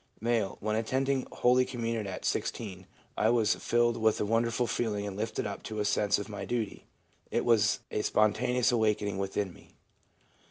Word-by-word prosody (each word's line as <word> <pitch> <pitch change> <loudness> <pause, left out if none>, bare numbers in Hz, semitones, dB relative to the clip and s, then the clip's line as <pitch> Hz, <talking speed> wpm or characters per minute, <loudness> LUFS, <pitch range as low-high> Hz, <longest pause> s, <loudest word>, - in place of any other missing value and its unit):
M. 115 -3 0
'When 110 +1 -1
attending 130 +4 0
holy 125 +1 +4
communion 115 -4 -3
at 95 - -6
16, 95 -5 -3 0.3
I 110 - +2
was 115 -3 +3
filled 120 0 +1
with 110 -1 +2
a - - +1
wonderful 115 +3 +1
feeling 105 -4 -1
and 100 -2 -5
lifted 110 +2 -2
up 100 -1 -5
to 110 -1 -4
a 105 - 0
sense 105 0 +2
of 100 - -5
my 105 -2 -6
duty. 115 -4 -3 0.4
It - - 0
was 115 -1 +3
a 105 - 0
spontaneous 125 +5 +2
awakening 105 -4 +1
within 95 -1 -2
me.' - - -19
110 Hz, 170 wpm, -30 LUFS, 105-120 Hz, 0.4 s, holy